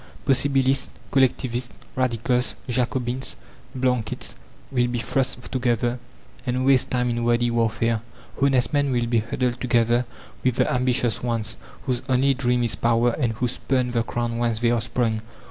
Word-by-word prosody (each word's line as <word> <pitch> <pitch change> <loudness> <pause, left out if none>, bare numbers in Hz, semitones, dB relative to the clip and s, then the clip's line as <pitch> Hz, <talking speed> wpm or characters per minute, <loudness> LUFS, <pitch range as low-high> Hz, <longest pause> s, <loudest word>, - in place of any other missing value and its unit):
Possibilists, 135 0 +3 0.2
Collectivists, 125 -2 +1 0.3
Radicals, 125 0 +1
Jacobins, 125 +1 -1 0.4
Blanquists, 125 -3 -1 0.4
will 125 -2 +2
be 120 0 -2
thrust 130 +2 -1
together, 120 -1 0 0.4
and 130 0 -1
waste 135 -2 +4
time 125 -1 +1
in 120 0 -1
wordy 120 0 +2
warfare. 115 -1 +1 0.4
Honest 135 -2 +3
men 145 -1 +2
will 120 -2 +1
be 115 -1 +2
huddled 120 +2 -2
together 120 0 +2 0.4
with 130 -2 +2
the - - +2
ambitious 125 -3 +1
ones, 115 -2 -1 0.3
whose 125 -2 -1
only 130 +2 +4
dream 125 -2 +1
is 115 -3 +1
power 115 +4 +2
and 120 -3 0
who 125 +3 -1
spurn 125 0 -1
the 120 -1 +1
crowd 120 0 -2
whence 115 -1 0
they 120 +1 +2
are 120 -2 +2
sprung. 115 -2 0
120 Hz, 150 wpm, -24 LUFS, 120-130 Hz, 0.4 s, waste